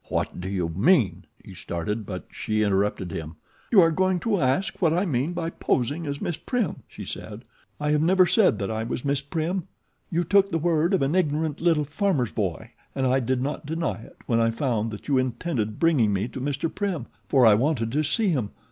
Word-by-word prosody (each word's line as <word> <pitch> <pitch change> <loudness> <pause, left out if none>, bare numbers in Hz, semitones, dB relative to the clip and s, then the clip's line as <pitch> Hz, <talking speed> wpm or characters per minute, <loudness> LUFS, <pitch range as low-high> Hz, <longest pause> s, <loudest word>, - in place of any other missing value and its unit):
"What - - -2
do 95 - -4
you 90 -4 -1
mean 110 - +2
" - - -27
he 95 - -10
started; 95 +5 -4
but 95 -2 -6
she 110 -1 -1
interrupted 100 -2 0
him. 80 0 -6 0.4
"You 205 -5 +8
are 165 -1 +4
going 185 +2 +1
to 205 -5 +1
ask 135 +12 0
what 165 -3 +3
I 180 +4 +1
mean 145 0 -1
by 165 -1 -3
posing 145 +5 -1
as 140 0 -3
Miss 170 - -3
Prim," 245 -7 -2
she - - -9
said. - - -7 0.4
"I 150 0 0
have 150 0 +3
never 185 +3 +5
said 210 +2 +3
that 100 0 -3
I 110 0 -2
was 120 +3 -4
Miss 140 0 +1
Prim. 165 +5 -2 0.4
You 170 +1 0
took 195 +2 +3
the 165 - 0
word 165 +2 +2
of 150 - +1
an 135 +3 0
ignorant 155 -3 0
little 165 -3 +3
farmer's 150 - 0
boy 95 -6 -3 0.2
and 135 - 0
I 130 +1 +3
did 130 0 -1
not 145 +1 -4
deny 160 -7 -2
it - - -15
when 115 -1 +1
I 115 0 +3
found 115 -2 -1
that 105 -1 -9
you 140 -3 +3
intended 125 -4 -2
bringing 140 -11 +3
me 100 +3 0
to 130 - -7
Mr. 145 +4 -2
Prim, 190 - -2 0.2
for 130 -3 +4
I 110 - +8
wanted 115 0 +1
to 150 +4 +1
see 200 +8 +1
him. 130 - 0
140 Hz, 220 wpm, -25 LUFS, 115-170 Hz, 0.4 s, You